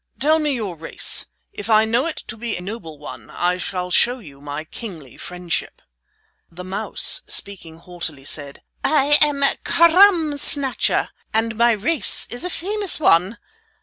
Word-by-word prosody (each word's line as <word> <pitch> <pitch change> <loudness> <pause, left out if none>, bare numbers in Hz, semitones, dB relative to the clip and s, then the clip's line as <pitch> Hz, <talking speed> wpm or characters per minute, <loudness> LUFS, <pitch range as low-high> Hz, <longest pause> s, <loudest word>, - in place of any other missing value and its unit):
Tell 310 +3 +2
me 300 -3 -1
your 205 -7 -5
race. 165 0 +1 0.3
If 205 +2 -8
I 215 0 +4
know 235 +6 0
it 325 - -7
to 240 - -8
be 230 -1 -4
a - - -8
noble 180 -5 -8
one 130 -6 -11
I 180 +1 -2
shall 180 0 -5
show 245 +7 +3
you 145 - -15
my 145 +1 -6
kingly 160 - -10
friendship." 180 -1 -4 0.7
The 175 +2 -11
mouse, 185 +2 0
speaking 175 -5 -2
haughtily, 165 -5 -7
said: 145 -1 -1 0.2
"I 295 -1 +3
am 290 -2 +3 0.2
Crumb 335 -3 +4
Snatcher, 280 -2 +2 0.3
and 225 0 0
my 235 +1 +3
race 280 +9 +3
is 245 - -3
a 360 - -3
famous 400 +2 0
one. 190 - +2
215 Hz, 155 wpm, -20 LUFS, 170-285 Hz, 0.7 s, I